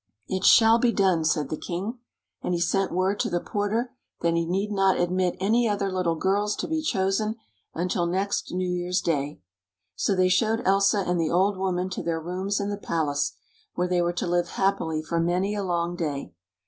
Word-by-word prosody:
"It 190 0 -2
shall 225 +2 +7
be 240 0 +3
done!" 190 -6 +2
said 150 -3 0
the 155 - -3
king. 200 +8 -4 0.4
And 180 - -1
he - - -1
sent 195 +3 +1
word 190 +3 0
to 230 - 0
the 175 -2 0
porter 215 +6 -2 0.3
that 170 0 +2
he 170 0 0
need 195 +4 -1
not 195 -2 +2
admit 180 0 +1
any 225 +4 +2
other 200 -1 -1
little 180 -3 0
girls 205 +5 0
to - - -4
be 320 0 -1
chosen 210 -4 0 0.4
until 175 0 0
next 195 +3 -1
New 185 0 -1
Year's 180 +1 -1
Day. 145 -4 -2 0.5
So 200 - +1
they 185 0 +3
showed 220 +5 +1
Elsa 195 +1 +3
and 175 -1 0
the 160 - 0
old 190 +3 +2
woman 185 -1 -1
to - - -3
their 165 -1 -1
rooms 185 +5 -2
in 200 0 -2
the 205 - -3
palace, 145 -7 -1 0.4
where 180 +1 0
they 180 -1 +1
were 175 0 +1
to 175 - -2
live 175 0 +1
happily 160 -5 0
for 165 +2 -1
many 180 +4 0
a 205 - -2
long 175 -1 -1
day. 145 - -4
185 Hz, 200 wpm, -25 LUFS, 170-200 Hz, 0.5 s, shall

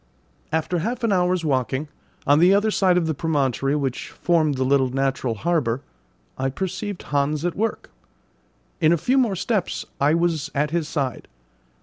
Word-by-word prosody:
After 160 +2 0
half 235 +7 -3
an 230 - +2
hour's 180 -2 +1
walking, 130 +1 0 0.4
on 145 +2 +5
the 180 +4 +6
other 210 +2 +2
side 185 -3 +3
of 175 - +2
the 160 - 0
promontory 140 -3 0
which 135 -4 -2
formed 160 -4 +1
the 130 - 0
little 130 0 +3
natural 135 -2 -1
harbour, 135 -3 0 0.6
I 135 0 0
perceived 190 +5 -4
Hans 145 +2 0
at 175 - 0
work. 225 +2 -2 0.9
In 160 -2 +4
a 170 - +4
few 255 - +2
more 230 -7 +2
steps 195 0 -1
I 145 +3 +3
was 165 -3 0
at 150 +1 +1
his 165 -2 -1
side. 140 -6 -3
160 Hz, 165 wpm, -23 LUFS, 140-180 Hz, 0.9 s, the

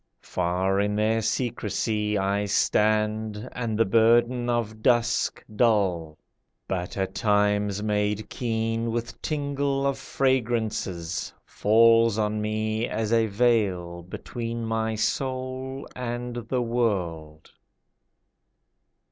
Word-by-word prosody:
Far 90 +2 0
in 105 +1 +1
their 110 +1 +2
secrecy 110 -2 -1
I 100 +1 0
stand, 105 +2 +1
and 115 -3 -3
the 115 - +4
burden 120 +3 +3
of 110 -2 -1
dusk 120 0 +1
Dull, 95 -9 +1 0.5
but 90 0 -3
at 95 -1 -2
times 105 -2 +1
made 105 0 0
keen 115 -1 -2
With 115 0 -4
tingle 140 -2 -1
of 140 -1 0
fragrances, 110 -9 -1
Falls 115 0 +4
on 105 0 0
me 110 +1 -1
as 110 +1 -1
a 115 -1 +3
veil 100 -6 +1
Between 115 +6 -5
my 110 0 -1
soul 130 +3 -3
and 120 -1 -4
the 125 -2 +1
world. 90 -10 -2
110 Hz, 105 wpm, -26 LUFS, 105-120 Hz, 0.5 s, the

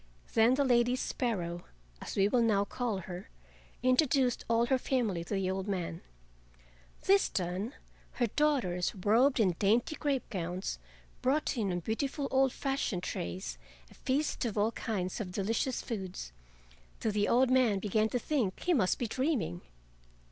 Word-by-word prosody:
Then 230 +3 +5
the 285 - +2
Lady 245 -1 +3
Sparrow, 180 -10 -2 0.4
as - - -6
we 195 0 +4
will 240 +3 +2
now 205 -3 +3
call 220 -3 -2
her, 180 0 -7 0.5
introduced 255 -1 +3
all 230 0 +3
her 260 +1 +2
family 225 -11 0
to 205 - -2
the 190 -1 0
old 190 +1 -3
man. 180 -4 -3 1.0
This 395 +1 +4
done, 185 +7 -2 0.4
her 245 - +1
daughters, 230 -10 +1
robed 230 +8 +3
in 190 -5 +4
dainty 225 +8 +2
crape 280 -4 -1
gowns, 180 - -3 0.4
brought 285 +4 +1
in 210 -6 0
on 175 0 -2
beautiful 275 - -2
old 265 0 +4
fashioned 270 -11 -2
trays 85 -9 -4 0.3
a - - -13
feast 280 +3 -1
of 225 -3 -2
all 210 +2 +2
kinds 200 -3 -3
of 185 -4 -5
delicious 225 +7 -1
foods, 190 - -5 0.7
till 220 - 0
the 205 0 +1
old 255 +2 +4
man 250 -6 +4
began 215 +2 +1
to 245 - 0
think 245 -7 -1
he 355 - +2
must 215 - +2
be 245 - -2
dreaming. 235 - -1
225 Hz, 155 wpm, -31 LUFS, 190-255 Hz, 1.0 s, Then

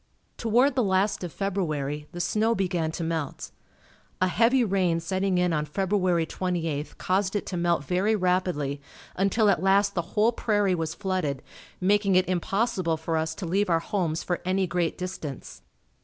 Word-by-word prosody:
Toward 240 +5 +3
the 260 - +1
last 195 0 +1
of 175 - -4
February, 150 -7 -2
the 175 - -7
snow 215 +6 +1
began 175 -5 -1
to 170 - -3
melt. 160 -3 -3 0.7
A 185 - +2
heavy 240 +6 +3
rain 185 -5 +1
setting 190 +2 0
in 180 -1 +2
on 150 -1 0
February 185 0 +1
28th 165 -4 -3
caused 190 +2 0
it 205 - -1
to 185 - -5
melt 170 -3 +1
very 190 +8 +1
rapidly 180 -7 0 0.3
until 195 +3 +2
at 190 -5 +3
last 200 +1 +3
the 175 - 0 0.2
whole 220 +3 +5
prairie 205 -4 +1
was 165 -2 -2
flooded, 185 -9 -2 0.4
making 200 +1 +2
it 185 0 +4
impossible 185 -1 0
for 160 +1 -3
us 160 0 -1
to 190 - -5
leave 195 +4 +1
our 165 - +4
homes 170 -4 -2
for 175 - -2
any 185 +1 +1
great 175 -2 -1
distance. 170 -7 -6
185 Hz, 170 wpm, -26 LUFS, 165-200 Hz, 0.7 s, whole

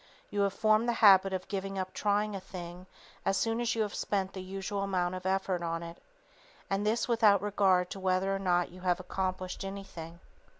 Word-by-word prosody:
You 205 - 0
have 200 -1 +2
formed 215 +2 +3
the - - +2
habit 195 -1 +7
of 185 -1 -3
giving 195 0 -4
up 185 0 -3
trying 210 0 0
a - - -3
thing 180 -1 -9 0.4
as 195 - +1
soon 225 +2 0
as 240 0 0
you 225 - +2
have 205 - -4
spent 195 -2 -1
the 190 - -6
usual 195 +2 -4
amount 185 -2 0
of 185 0 -4
effort 190 -2 0
on 165 0 -2
it, 170 0 -9 0.7
and 195 +1 +1
this 225 +2 +1
without 215 -5 +4
regard 190 -3 +2
to 195 - -5
whether 190 +1 +1
or - - -3
not 175 -2 +1
you 180 +1 -12
have 180 -1 +1
accomplished 185 0 -3
anything. 190 -4 -7
195 Hz, 205 wpm, -31 LUFS, 185-200 Hz, 0.7 s, habit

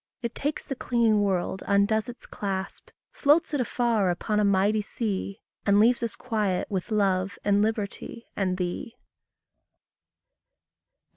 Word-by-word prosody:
It 235 -1 -2
takes 295 +2 -2
the - - -3
clinging 230 -4 +2
world, 190 -1 -1
undoes 210 +3 +2
its 245 - -9
clasp, 195 -1 -5 0.2
Floats 310 +3 +3
it 285 - +1
afar 235 -5 +1
upon 210 +4 0
a - - +3
mighty 200 +2 +3
sea, 205 -1 -3 0.2
And 200 0 +4
leaves 235 +3 +4
us 230 -2 -2
quiet 210 -6 -1
with 190 +1 -2
love 195 -3 +1
and 205 0 +3
liberty 220 +2 -3
and 185 -2 0
thee. 180 +5 -4
210 Hz, 135 wpm, -26 LUFS, 195-230 Hz, 0.2 s, And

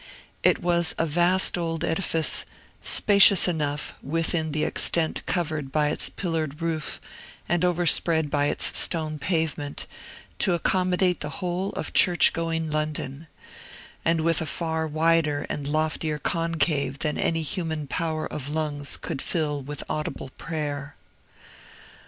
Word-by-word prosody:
It - - +2
was 170 -1 +3
a 165 - +1
vast 175 +3 +2
old 165 -1 -3
edifice, 165 -2 0 0.4
spacious 200 -2 +5
enough, 150 -4 -2
within 160 +1 -1
the 155 +1 -1
extent 160 0 +2
covered 155 -6 -2
by 150 +1 +1
its - - 0
pillared 160 -5 -3
roof 165 -2 -3 0.5
and 175 +1 0
overspread 170 -3 +3
by 145 0 +1
its - - +3
stone 155 -3 +4
pavement, 155 -3 -2 0.5
to 180 - +2
accommodate 180 +1 +1
the 150 - -5
whole 185 +1 -2
of - - -4
church 175 -3 +5
going 165 -1 -2
London, 155 -1 -3 0.8
and 165 0 +1
with 165 0 +2
a 160 - -3
far 160 -1 -2
wider 155 -1 +1
and 145 -1 -4
loftier 155 0 -1
concave 155 -3 -1
than 150 +1 -2
any 165 -1 0
human 160 -1 -3
power 160 +1 -3
of 145 -1 -6
lungs 150 -2 -2
could 155 -6 -5
fill 150 -4 -2
with 145 +1 -6
audible 155 -3 -4
prayer. 145 -3 -5
160 Hz, 135 wpm, -25 LUFS, 150-170 Hz, 0.8 s, spacious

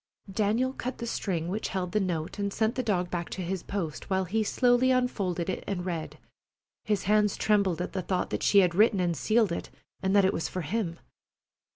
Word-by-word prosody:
Daniel 220 +6 +1
cut 255 -1 -4
the 235 - -5
string 180 -7 -2
which 205 +5 -2
held 185 -2 -3
the 215 - +2
note 175 -1 -2
and 200 0 -1
sent 220 +2 +1
the 260 - -1
dog 180 -7 0
back 175 -1 -3
to 185 - -4
his 185 +1 -2
post, 170 -7 -4
while 190 -1 +1
he 215 +5 0
slowly 245 +3 +3
unfolded 200 -9 0
it 190 - -3
and 180 -3 -2
read, 170 -4 -4 0.7
his 210 -3 0
hands 210 +1 +3
trembling 200 -5 +2
at 180 - -3
the 190 - -1
thought 185 0 -2
that - - -2
she 200 - +6
had 180 -2 +2
written 210 +2 +4
and 175 -2 +1
sealed 220 - +2
it, 170 - -4 0.3
and 190 +1 +1
that 200 -2 +6
it 190 - +2
was 165 - -2
for 185 - -3
him. 170 0 -2
195 Hz, 215 wpm, -28 LUFS, 180-215 Hz, 0.7 s, she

